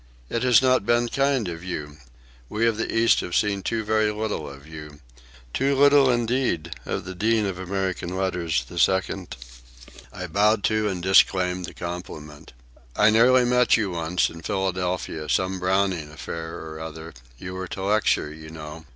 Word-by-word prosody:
"It 115 - -1
has 125 0 +5
not 130 -4 +3
been 120 +2 +2
kind 135 -5 +1
of 85 -1 -6
you. 75 -5 -6 0.5
We 115 +2 0
of 115 -2 +1
the 115 - -2
East 115 +1 +4
have 85 - -4
seen 100 -2 +1
so 115 -1 -1
very 110 0 +2
little 105 -8 -3
of 70 +1 -12
you—too 75 - -5
little, 140 -1 +5
indeed, 120 -9 0
of - - -3
the 95 - -6
Dean 110 +3 +1
of 95 -2 -4
American 95 -1 -3
Letters, 90 -7 -1
the - - -6
Second." 95 -1 0 0.8
I - - -6
bowed 105 +1 +2
to, 110 -1 +1
and 90 -3 -4
disclaimed, 90 -1 +3
the - - -11
compliment. 80 -5 -8 0.4
"I 105 +1 +5
nearly 125 +3 +5
met 125 0 +4
you, 105 -4 -1
once, 85 +1 0
in 85 - -11
Philadelphia, 90 -4 -2
some 95 0 0
Browning 95 -4 0
affair 80 +1 -7
or 80 -1 -8
other—you 80 -1 -9
were 95 0 -5
to 95 - -6
lecture, 100 -7 +1
you 80 0 -11
know. 80 0 -9
95 Hz, 165 wpm, -24 LUFS, 80-110 Hz, 0.8 s, has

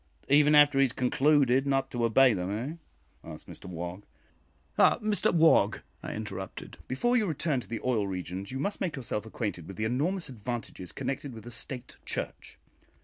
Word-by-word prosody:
"Even 150 +2 +6
after 145 -2 +6
he - - +6
has 130 - -3
concluded 135 0 +3
not 135 -1 +1
to 120 -1 -2
obey 120 +2 +5
them, 90 -1 -2
eh?" 115 +9 -3 0.5
asked - - -10
Mr - - -11
Wog. 90 +1 -6 0.7
"Ah, - - +5
Mr 215 -1 +2
Wog," 165 -2 +4 0.2
I - - -5
interrupted, - - -7
"before 240 - +1
you 220 -4 +2
return 155 -3 0
to - - -9
the 115 - -4
oil 115 -6 +1
regions, 95 +1 -5
you 130 - -4
must 200 +10 -3
make 170 - -1
yourself 115 -5 -4
acquainted 105 -7 -4
with 95 - -9
the 110 - -1
enormous 155 - -1
advantages 120 - -6
connected 135 -2 -4
with 110 -1 -10
a 120 - -8
State 125 +1 -6
Church. - - -4
130 Hz, 180 wpm, -29 LUFS, 110-145 Hz, 0.7 s, Even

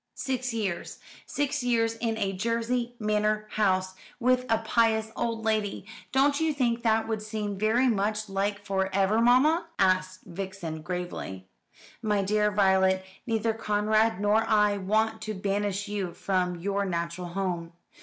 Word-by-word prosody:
"Six 255 -1 -2
years 200 -6 -3 0.3
six 290 0 -1
years 230 -2 +1
in 225 -1 -1
a 195 -3 -1
Jersey 235 +4 -1
manor 215 0 0
house 185 -3 +1 0.3
with 250 0 +2
a 225 - +5
pious 220 -1 +1
old 230 -1 -2
lady. 215 -3 -1 0.3
Don't 280 +2 +3
you 320 -2 +1
think 240 -3 +1
that 225 -1 +2
would 220 -1 -2
seem 210 -1 -4
very 220 +6 +2
much 215 -1 0
like 200 +1 -2
for 190 -1 0
ever, 200 +3 +3
mamma?" 285 +8 +4
asked 185 0 +1
Vixen 185 -3 -6
gravely. 175 - -5 0.6
"My 210 -3 +1
dear 210 +1 +2
Violet, 190 -2 +3 0.2
neither 225 -1 +1
Conrad 215 0 +1
nor 205 +1 +3
I 210 -2 +3
want 220 +3 0
to 215 0 -4
banish 200 +1 -1
you 200 -4 -3
from 180 -2 0
your 200 +3 -1
natural 170 -1 -3
home. 175 -2 -3
210 Hz, 145 wpm, -27 LUFS, 190-225 Hz, 0.6 s, a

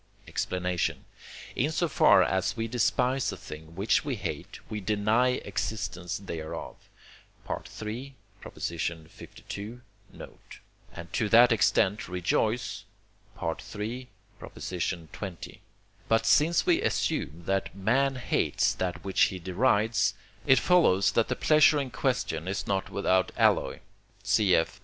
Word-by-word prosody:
Explanation 90 -1 -2 0.5
In 145 +5 +1
so 170 +2 0
far 140 - +5
as 95 0 0
we 115 0 -1
despise 125 +2 +1
a - - -7
thing 80 +2 -10
which 100 - +2
we 145 -3 -2
hate, 100 - -6
we 105 - -4
deny 110 +5 +2
existence 90 -5 -3
thereof 80 -5 -7 0.6
(III. 120 +6 -6 0.3
lii. 85 +7 -6 0.3
note), - - -13 0.3
and 85 0 -10
to 110 - 0
that 120 +3 +7
extent 105 -2 +2
rejoice 105 +6 -1 0.6
(III. 105 +9 -4 0.3
xx.). 90 +1 -5 0.5
But 115 0 +3
since 155 +8 +4
we - - +3
assume 80 +4 -1
that 95 +1 -1
man 130 +8 +1
hates 125 - +1
that 90 -1 -3
which 95 - 0
he 95 - -4
derides, 105 +5 +1 0.3
it 135 - +6
follows 100 - +4
that 115 +3 +2
the - - -1
pleasure 155 -1 +5
in 135 -3 -3
question 85 - -1
is 100 +1 -2
not 95 -1 -1
without 95 -2 +1
alloy - - +2 0.4
(cf. 95 -6 +2
105 Hz, 120 wpm, -28 LUFS, 90-125 Hz, 0.6 s, that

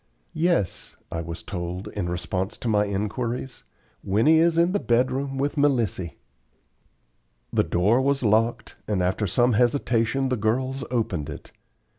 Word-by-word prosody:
"Yes," 165 - 0
I 80 - -2
was 85 +1 -7
told, 90 +2 -5
in 100 -4 -3
response 90 +3 -3
to - - -5
my 105 -2 +3
inquiries; 115 +6 -3 0.4
"Winnie 115 +12 +4
is 165 0 +3
in 170 +1 +4
the 205 - +1
bed 120 -2 +2
room 135 +1 -3
with 145 +2 -1
Melissy." 115 - +1 1.4
The - - +3
door 105 +9 +2
was 140 0 +1
locked, 115 +2 +1
and 100 -4 0
after 95 +3 0
some 120 +7 +3
hesitation 120 +2 +1
the 130 - 0
girls 130 +6 -1
opened 95 - -1
it. 75 - -9
115 Hz, 145 wpm, -25 LUFS, 95-135 Hz, 1.4 s, Winnie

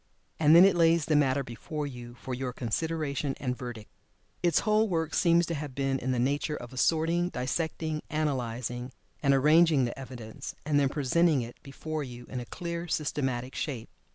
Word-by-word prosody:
And 155 0 +6
then 175 +2 +10
it 195 - +4
lays 165 -2 +4
the 155 - +2
matter 140 -1 +3
before 135 +5 -5
you 120 -3 -8
for 130 +2 -6
your 125 0 -3
consideration 140 +3 -2
and 125 -2 -2
verdict. 120 -4 -7 0.5
Its 175 -4 +3
whole 215 +1 +3
work 160 -3 -1
seems 170 0 +4
to 170 - -3
have 145 -4 -5
been 135 -1 0
in 130 - -2
the 125 - 0
nature 145 +5 0
of 120 -1 -9
assorting, 165 +6 +2
dissecting, 155 +3 -2
analyzing, 125 -4 -2 0.3
and 140 - +3
arranging 150 +1 +5
the 120 +3 -5
evidence, 120 -4 -8
and 145 -1 +3
then 140 -1 +3
presenting 150 0 +2
it 120 +1 -10
before 155 +2 -5
you 120 -2 -9
in 125 - -4
a 120 - -6
clear, 170 +4 -5
systematic 130 -5 -2
shape. 125 -7 -4
140 Hz, 180 wpm, -29 LUFS, 125-160 Hz, 0.5 s, then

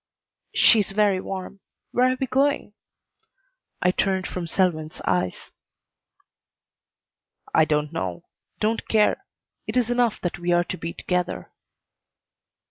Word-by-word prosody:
"She's 215 -4 +5
very 200 -1 +2
warm. 195 +1 -6 0.3
Where 255 +1 +3
are 255 - -2
we 265 - +1
going?" 275 -3 +1 1.1
I 180 - +4
turned 190 -1 0
from 180 -2 -4
Selwyn's 160 -4 0
eyes. 90 0 -1 2.0
"I 160 - +5
don't 150 -1 0
know. 90 - -4 0.3
Don't 220 +2 0
care. 220 - +2 0.4
It 215 +3 -1
is 245 -1 +2
enough 245 -2 +2
that 175 -1 -3
we 175 0 -1
are 175 0 +4
to 185 - -5
be 165 - -4
together." 180 -1 -2
190 Hz, 125 wpm, -24 LUFS, 170-220 Hz, 2.0 s, She's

